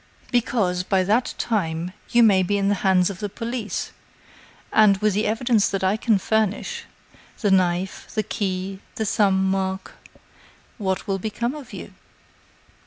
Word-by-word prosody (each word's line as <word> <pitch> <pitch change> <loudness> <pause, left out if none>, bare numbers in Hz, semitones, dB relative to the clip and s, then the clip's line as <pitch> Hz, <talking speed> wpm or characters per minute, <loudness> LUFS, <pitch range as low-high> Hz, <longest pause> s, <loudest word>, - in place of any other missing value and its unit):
"Because 220 -7 +1
by 185 0 +1
that 220 +7 +1
time 175 -5 -1 0.2
you 240 0 +5
may 200 -4 +5
be 205 +3 0
in 200 0 +1
the - - +3
hands 190 -1 +3
of 190 - -9
the 205 - -3
police, 230 0 -4 0.8
and, 210 -2 +6
with 210 +1 +1
the 210 +3 +1
evidence 225 0 +2
that 195 -1 -2
I 190 +2 +3
can 220 -1 +2
furnish 215 +1 -1 0.6
the 205 - +2
knife, 185 0 +1
the 215 - +1
key, 190 -1 -3 0.2
the 220 - -2
thumb 195 -2 +2
mark 190 0 -1 0.9
what 190 -2 -1
will 195 -2 -1
become 220 +5 -2
of 290 -5 -10
you?" - - -9
200 Hz, 155 wpm, -23 LUFS, 190-220 Hz, 0.9 s, and